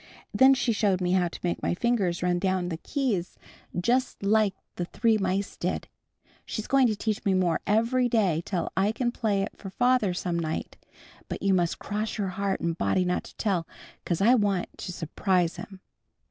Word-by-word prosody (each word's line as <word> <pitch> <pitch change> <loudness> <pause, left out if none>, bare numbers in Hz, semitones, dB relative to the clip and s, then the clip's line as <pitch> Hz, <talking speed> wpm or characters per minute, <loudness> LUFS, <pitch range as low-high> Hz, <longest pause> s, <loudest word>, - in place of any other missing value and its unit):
Then 265 +1 +6
she 245 -2 +1
showed 205 -4 +2
me 180 -1 0
how 180 -1 +3
to 170 - -8
make 175 - -1
my - - 0
fingers 195 -6 0
run 175 0 +1
down 185 -1 0
the 165 - -3
keys 215 - -2 0.4
just 245 +4 0
like 205 -1 +3 0.2
the 175 - -2
three 220 +4 +1
mice 195 +1 -1
did. - - -3 0.6
She's 215 - -5
going 270 -2 +4
to 215 - 0
teach 215 0 -2
me 195 -3 +2
more 180 -3 +1
every 235 +4 +2
day 195 -9 +2
till 175 -3 -2
I 200 +3 +2
can 240 +1 -1
play 210 -5 0
it 200 - -6
for 195 - -8
father 245 -3 +2
some 175 -2 -1
night. 160 -1 -3 0.5
But - - -5
you 195 -1 +3
must 175 -2 +1
cross 210 +1 -3
your 200 -3 -1
heart 195 +1 -2
and 170 -1 -1
body 185 +2 +1
not 180 0 -1
to - - -13
tell 185 -6 0 0.4
'cause 170 +1 -1
I 230 +5 +6
want 205 -6 +1
to - - -5
s'prise 175 +1 0
him." 195 -2 -9
195 Hz, 195 wpm, -27 LUFS, 180-220 Hz, 0.6 s, Then